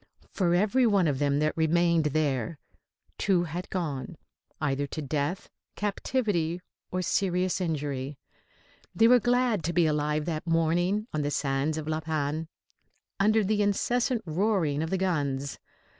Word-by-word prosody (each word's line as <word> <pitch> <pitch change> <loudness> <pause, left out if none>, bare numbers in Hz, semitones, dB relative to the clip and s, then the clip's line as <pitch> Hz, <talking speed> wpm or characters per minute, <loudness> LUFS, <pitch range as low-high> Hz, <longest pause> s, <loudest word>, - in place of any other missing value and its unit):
Flor 175 -3 +2
every 215 +7 +3
one 200 -5 +3
of 140 -3 0
them 140 -1 +2
that 155 +1 +1
remained 165 0 +2
there, 145 -3 0 0.6
two 185 -4 +2
had 175 +2 -5
gone, 165 -2 -4 0.4
either 145 -2 -1
to 155 - -6
death, 150 +4 -2 0.3
captivity 200 -5 -1 0.3
or 185 0 -2
serious 185 0 0
injury. 145 -4 -3 0.8
They 225 - +5
were 250 +1 +7
glad 245 -4 +1
to 170 - -1
be 170 -1 +4
alive 150 0 0
that 165 0 -3
morning 175 +5 +1
on 155 - 0
the 145 - -1
sands 140 +2 0
of 155 -1 -5
La 155 0 0
Panne, 155 0 -2 0.7
under 215 +2 +4
the 210 +1 +1
incessant 235 +4 +1
roaring 165 -4 +1
of 160 - -2
the 190 - 0
guns. 145 -7 -1
165 Hz, 145 wpm, -28 LUFS, 150-195 Hz, 0.8 s, were